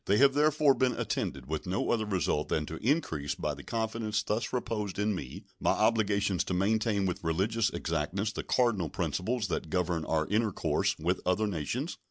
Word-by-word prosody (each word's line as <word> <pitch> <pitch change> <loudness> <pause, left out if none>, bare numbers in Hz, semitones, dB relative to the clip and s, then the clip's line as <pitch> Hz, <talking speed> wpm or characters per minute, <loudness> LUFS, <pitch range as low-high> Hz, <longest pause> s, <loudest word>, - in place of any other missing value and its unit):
They 100 - +4
have 135 +2 +6
therefore 150 -1 +4
been 130 -2 +1
attended 65 -2 -2
with 80 +5 -4
no 95 +3 0
other 110 -2 +1
result 90 -6 0
than 75 - 0
to 80 - -6
increase, 80 - 0
by - - -2
the - - -9
confidence 110 -2 -2
thus 110 +3 -1
reposed 110 -5 -2
in 105 +1 +1
me, 70 -9 -6 0.2
my - - +2
obligations 105 -4 +2
to 90 - -2
maintain 105 +1 +1
with 90 -2 -2
religious 100 +7 +1
exactness 85 +6 -2
the - - -4
cardinal 110 -10 +1
principles 110 - -1
that 80 - -2
govern 90 -1 0
our 80 -1 +1
intercourse 105 +1 +1
with 90 +4 -1
other 90 +4 +1
nations. 105 - -3
100 Hz, 180 wpm, -30 LUFS, 85-115 Hz, 0.2 s, have